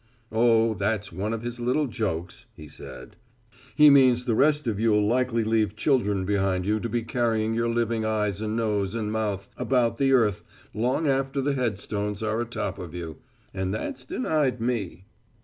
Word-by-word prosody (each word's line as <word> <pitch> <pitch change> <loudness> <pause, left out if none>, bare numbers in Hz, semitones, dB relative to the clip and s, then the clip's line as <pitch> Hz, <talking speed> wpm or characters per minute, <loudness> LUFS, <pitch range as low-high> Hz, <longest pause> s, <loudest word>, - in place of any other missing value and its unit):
"Oh, 115 0 +3
that's 100 0 -2
one 100 +6 -3
of 115 0 -4
his 120 0 -5
little 125 +5 +1
jokes," 95 -9 -4
he 75 - -11
said, 65 -2 -11 0.6
"he 150 -1 +8
means 130 -3 +5
the 120 - +1
rest 150 +5 +3
of 110 -4 -1
you'll 105 -2 +3
likely 120 0 +1
leave 110 -2 +1
children 105 -7 +1
behind 95 -2 0
you 105 +2 +1
to 115 - -4
be 120 -1 -1
carrying 115 -2 0
your 115 +1 0
living 115 -1 0
eyes 105 -2 -1
and 110 0 -2
nose 105 -3 -1
and 105 -2 -2
mouth 105 -3 -2
about 125 -1 +1
the 135 -1 +3
earth 115 -7 +3 0.3
long 125 +8 0
after 135 0 0
the 140 +1 0
headstones 105 -4 -2
are 110 +1 0
atop 110 -5 -4
of 90 -2 -8
you 80 -3 -6 0.4
and 95 +1 -2
that's 125 +3 -5
denied 130 0 -1
me." 110 -6 -3
110 Hz, 175 wpm, -25 LUFS, 105-125 Hz, 0.6 s, he